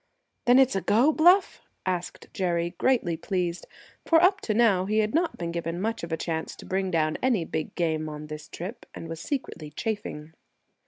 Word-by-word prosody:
"Then 245 +1 +6
it's 265 -5 +5
a 195 - 0
go, 240 +11 +4
Bluff?" 355 +5 +4 0.2
cried 180 -1 -3
Jerry, 175 -2 -1
greatly 235 -10 +2
pleased, 175 0 -2 0.4
for 330 - +5
up 380 +3 +4
to 215 - -1
now 210 -6 +4
he 215 +2 0
had 215 0 +1
not 335 +2 +1
been 170 -1 -3
given 170 0 -3
much 225 +3 -2
of 170 - -6
a 160 - 0
chance 160 -1 -3
to - - -12
bring 190 0 -1
down 155 -3 0
any 235 -10 +2
big 155 - -4
game 160 -3 -1
on 150 0 -7
this 150 0 -8
trip, 190 +8 -8
and 165 - -7
was 165 0 -6
secretly 210 - -4
chafing. 160 -4 -5
185 Hz, 195 wpm, -27 LUFS, 165-235 Hz, 0.4 s, Then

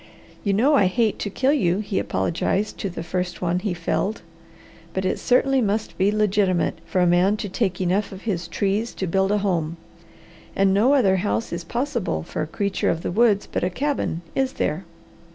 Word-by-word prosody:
"You 200 - +1
know 250 +9 +3
I 200 -10 +5
hate 220 +3 +1
to 205 - -2
kill 260 +7 +1
you," 180 - +2
he 205 -1 -2
apologized 170 - -1
to 200 - -2
the 170 -2 -6
first 180 +1 -3
one 180 0 0
he 190 -2 -2
felled. 185 +5 -2 0.7
"But 190 0 -1
it 185 - 0
certainly 270 +1 +3
must 215 0 -1
be 195 +2 +2
legitimate 205 -4 +1
for 185 - +1
a - - +4
man 180 +4 +3
to 210 - -4
take 190 -2 -1
enough 190 +3 0
of 190 0 -10
his 180 -6 -2
trees 205 +6 -1
to 190 - -2
build 190 +2 +1
a 210 - +3
home. 170 -5 -1 0.8
And 195 0 +3
no 235 +8 +4
other 195 -8 +4
house 205 +3 -1
is 170 0 -4
possible 235 - -2
for - - -5
a 155 - -2
creature 200 +5 -1
of 165 - -1
the - - -2
woods 210 0 +3
but - - -1
a 180 - +2
cabin, 265 - -2
is 265 -1 0
there? 160 +5 -2
195 Hz, 200 wpm, -23 LUFS, 180-215 Hz, 0.8 s, I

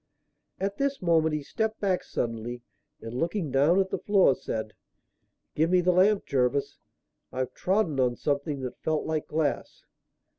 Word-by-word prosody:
At 200 +1 -2
this 280 0 0
moment 160 -3 +2
he 150 - -3
stepped 220 +7 -2
back 190 -3 0
suddenly, 120 +1 -4 0.4
and, 115 +1 -7
looking 165 +3 -2
down 145 +8 +4
at 190 -1 0
the - - -1
floor, 195 -8 +4
said: 110 -3 -5 0.8
"Give 160 +2 +2
me 180 0 +4
the 180 +1 +3
lamp, 195 +3 +3
Jervis, 130 +1 0 0.5
I've 130 0 -3
trodden 185 -7 0
on 125 -2 +2
something 140 0 -2
that 125 -1 -6
felt 155 -1 -1
like 155 -1 -2
glass." 155 -1 -2
155 Hz, 155 wpm, -27 LUFS, 130-190 Hz, 0.8 s, down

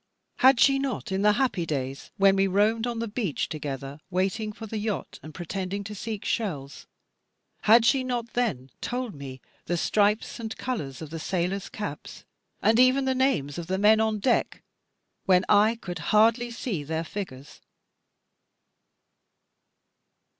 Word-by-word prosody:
Had 260 -1 +6
she 275 +2 +5
not 265 -6 -3
in 190 +1 0
the 210 0 +5
happy 240 -7 0
days, 135 -4 -4
when 195 0 +5
we 195 0 +3
roamed 215 +4 +2
on 240 -1 -3
the 230 0 -2
beach 205 - -2
together, 140 -2 -5
waiting 195 +4 -1
for 220 +2 -9
the 220 0 -4
yacht 205 -8 -4
and 155 - -10
pretending 185 +4 -4
to 210 +1 -7
seek 215 0 -5
shells, 145 -11 -3 0.8
had 225 +2 +7
she 260 +2 +3
not 240 -2 -3
then 165 - -1
told 245 -2 -3
me 135 -3 -9 0.3
the 175 - 0
stripes 210 +6 +1
and 225 -1 -5
colours 155 - -4
of 155 - -9
the 165 - -5
sailors' 185 +3 -2
caps, 210 -1 -7 0.4
and 225 +2 +4
even 255 +2 +5
the 265 - +2
names 175 - 0
of 170 - -6
the 190 +1 -1
men 215 +2 +5
on 220 -1 +1
deck, 235 +4 0 0.6
when 185 -1 +4
I 210 +2 +5
could 180 -7 -7
hardly 225 +8 +3
see 230 - -4
their 160 +2 -2
figures? 150 -7 -8
205 Hz, 155 wpm, -26 LUFS, 165-230 Hz, 0.8 s, had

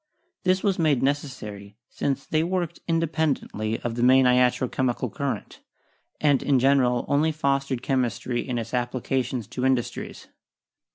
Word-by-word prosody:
This 185 +1 +2
was 195 -3 +1
made 150 -6 +2
necessary, 105 -8 -3
since 140 -1 -2
they 155 - +1
worked 175 -1 -2
independently 155 -9 -1
of 120 - -3
the 120 - -3
main 130 +1 +6
iatro 125 0 +3
chemical 125 -2 -1
current 140 -2 -4 0.6
and, 145 -3 +3
in 140 -2 +2
general, 125 -2 +3
only 145 +3 +2
fostered 140 -4 -1
chem 135 -2 +1
istry 120 0 -2
in 125 -2 -3
its 115 0 -5
applications 125 0 -1
to 125 - -4
industries. 130 -2 -1
130 Hz, 145 wpm, -25 LUFS, 125-145 Hz, 0.6 s, main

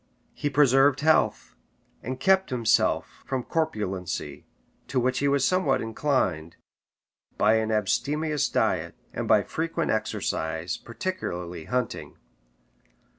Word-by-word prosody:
He 145 - -2
preserved 135 -1 +4
health, 155 - +2 0.5
and 130 +2 -5
kept 190 +6 +3
himself 120 -4 +1
from 130 -2 -3
corpulency, 105 - -3 0.4
to 130 - 0
which 125 +1 +1
he 140 - +1
was 140 -1 +2
somewhat 185 -7 +2
inclined, 110 - -1 0.8
by 110 +2 +4
an 110 0 -1
abstemious 145 +9 0
diet, - - 0 0.2
and - - -3
by - - +5
frequent 165 0 -2
exercise, 80 -5 -2
particularly 90 - -5
hunting. 125 -1 -3
130 Hz, 110 wpm, -26 LUFS, 105-150 Hz, 0.8 s, by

